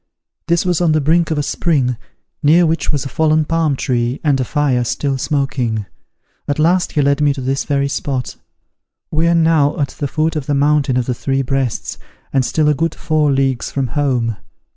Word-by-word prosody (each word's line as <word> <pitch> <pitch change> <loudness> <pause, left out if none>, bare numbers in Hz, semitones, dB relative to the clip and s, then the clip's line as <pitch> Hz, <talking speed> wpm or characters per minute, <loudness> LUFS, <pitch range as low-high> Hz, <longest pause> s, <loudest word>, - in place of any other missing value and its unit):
This 170 +1 +1
was 180 -2 +1
on 165 -3 +3
the 155 - +3
brink 165 +3 +2
of 160 - -1
a 145 - 0
spring, 140 -5 0 0.5
near 160 +4 +5
which 160 -1 0
was 145 -2 -2
a - - -2
fallen 155 +2 +1
palm 165 -2 +1
tree, 120 0 -1
and 145 -4 +2
a - - +1
fire, 135 -2 0
still 135 +4 -1
smoking. 130 -7 -1 0.6
At 145 - -1
last 175 +3 +2
he 150 - +2
led 140 +1 +1
me 145 -1 +2
to 135 - -5
this 135 +2 -1
very 140 -1 0
spot. 135 -2 -3 0.8
We 160 +2 +1
are 170 - +3
now 160 -3 +2
at 140 -2 0
the 145 - -4
foot 160 +3 -1
of 150 -4 -3
the 145 - +1
mountain 145 -2 +2
of 125 - 0
the 125 - -1
Three 135 +2 -1
Breasts, 135 -2 -2 0.3
and 135 -1 +3
still 155 +4 +1
a 150 - +4
good 165 +2 -1
four 155 -3 +1
leagues 135 -2 0
from 135 -3 -2
home. 125 -5 0
145 Hz, 205 wpm, -17 LUFS, 135-155 Hz, 0.8 s, near